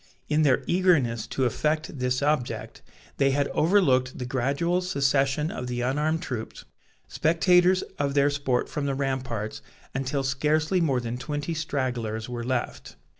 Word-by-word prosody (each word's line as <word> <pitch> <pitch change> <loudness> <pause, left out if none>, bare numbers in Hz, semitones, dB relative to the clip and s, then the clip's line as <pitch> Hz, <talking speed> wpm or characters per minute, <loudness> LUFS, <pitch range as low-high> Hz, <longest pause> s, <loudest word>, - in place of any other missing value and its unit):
In 150 +1 +2
their 140 -5 +3
eagerness 155 - +2
to 130 - -1
effect 155 +4 -1
this 125 +1 0
object, 145 -4 -1 0.4
they 135 -1 +3
had 140 +1 +1
overlooked 140 -8 +2
the 125 - -4
gradual 140 +8 0
secession 140 -3 +1
of 125 - -5
the 120 0 -3
unarmed 150 +6 0
troops, 115 -3 -6 0.4
spectators 180 +3 +3 0.2
of 140 -1 0
their 140 0 +4
sport 140 -3 0
from 145 -1 -3
the 135 - -1
ramparts, 130 -6 -3 0.3
until 135 +1 -1
scarcely 155 +7 +1
more 135 -6 +1
than 120 +1 -4
twenty 145 +4 -3
stragglers 125 -8 -2
were 120 -1 -5
left. 125 0 -3
140 Hz, 145 wpm, -26 LUFS, 125-155 Hz, 0.4 s, their